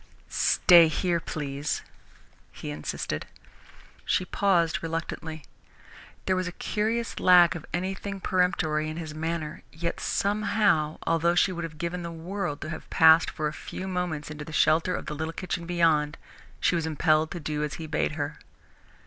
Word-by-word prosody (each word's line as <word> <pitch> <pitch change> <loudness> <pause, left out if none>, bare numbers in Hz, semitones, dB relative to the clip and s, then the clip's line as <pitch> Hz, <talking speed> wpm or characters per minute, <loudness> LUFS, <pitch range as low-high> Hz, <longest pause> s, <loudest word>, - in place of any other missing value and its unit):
"Stay 170 -2 +6
here, 170 +2 0
please," 145 -2 -3 0.7
he - - -7
insisted. 75 0 -4 0.8
She 185 - +1
paused 175 -4 +1
reluctantly. 160 -1 -4 0.8
There 185 - +2
was 185 0 -1
a - - -3
curious 225 +5 -2
lack 175 -2 +7
of 170 - -8
anything 190 +2 -3
peremptory 180 -5 +1
in 155 - -6
his 160 -2 -6
manner, 160 -1 -3
yet 170 +1 -3
somehow, 200 -6 +1
although 165 +1 +2
she 185 - +4
would 170 -2 -4
have 155 -2 -9
given 170 +2 -3
the 170 0 -5
world 165 -1 -4
to 155 - -5
have 160 - -8
passed 160 +1 +6
for 155 - -2
a 150 - -4
few 190 - -7
moments 180 -5 -3
into 150 0 -6
the 155 - -9
shelter 160 +3 +3
of - - -5
the - - -4
little 160 +2 -4
kitchen 175 -1 -4
beyond, 160 -3 +2 0.4
she - - +2
was 165 -2 0
impelled 155 0 +2
to 175 - -5
do 150 -1 -2
as 150 - -3
he 160 - -6
bade 155 -1 -1
her. 145 0 -4
165 Hz, 165 wpm, -27 LUFS, 155-180 Hz, 0.8 s, lack